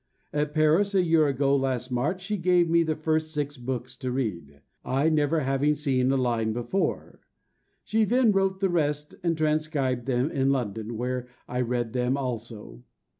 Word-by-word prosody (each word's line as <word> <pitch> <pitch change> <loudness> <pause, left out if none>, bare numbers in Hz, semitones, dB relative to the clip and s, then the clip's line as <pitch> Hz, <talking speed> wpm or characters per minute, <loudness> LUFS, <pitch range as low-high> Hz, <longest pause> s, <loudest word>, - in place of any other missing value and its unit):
At 150 0 -1
Paris, 165 +6 +3
a 185 - +4
year 165 -3 +3
ago 140 0 +2
last 130 -2 -1
March, 145 +10 -1
she 210 +3 -2
gave 180 -2 +3
me 170 +1 +4
the 160 -1 0
first 155 0 -1
six 145 -1 -2
books 125 0 -5
to 130 -2 -3
read, 85 - -4 0.2
I 140 +5 +1
never 155 0 +2
having 135 +2 +1
seen 135 -3 +1
a 135 - +2
line 115 -3 0
before. 120 - -2 0.6
She 220 0 +1
then 240 +1 +3
wrote 195 -1 0
the 195 - +2
rest 150 -3 -1
and 170 -2 0
transcribed 150 -5 0
them 130 +3 +1
in 135 -2 +1
London, 115 -4 -2
where 125 +1 -3 0.2
I 125 +1 -2
read 120 -2 -2
them 125 +1 0
also. 115 - -6
140 Hz, 175 wpm, -26 LUFS, 125-160 Hz, 0.6 s, a